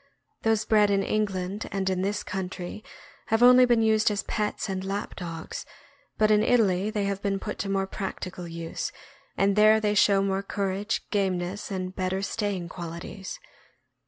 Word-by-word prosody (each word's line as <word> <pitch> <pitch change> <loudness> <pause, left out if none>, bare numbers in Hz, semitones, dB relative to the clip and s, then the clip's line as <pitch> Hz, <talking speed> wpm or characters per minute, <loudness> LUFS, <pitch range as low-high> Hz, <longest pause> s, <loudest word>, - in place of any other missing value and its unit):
Those 220 -1 +2
bred 210 -2 +4
in 195 -1 +2
England 200 -1 -2
and 195 -1 -1
in 185 -1 +1
this 200 +1 -1
country 185 +1 -5 0.4
have 225 +2 +2
only 250 +1 +8
been 240 -2 +3
used 220 -1 +4
as 205 -1 -1
pets 210 0 -2
and 190 -1 -3
lap 195 +2 -4
dogs, 165 -3 -6 0.5
but 215 0 +4
in 210 0 +5
Italy 210 -4 +3
they 210 -1 -1
have 200 0 -2
been 200 -1 0
put 210 +2 -5
to 195 - -2
more 195 0 +1
practical 185 -2 -5
use, 165 0 -4 0.5
and 195 0 +3
there 215 +1 +6
they 210 -1 +1
show 200 -1 +4
more 195 0 0
cour 200 -1 -2
age, 205 +4 -2
gameness, 190 -1 -1
and 185 -1 -4
better 185 +1 -1
staying 200 -4 -2
qualities. 170 +3 -7
195 Hz, 170 wpm, -27 LUFS, 185-210 Hz, 0.5 s, only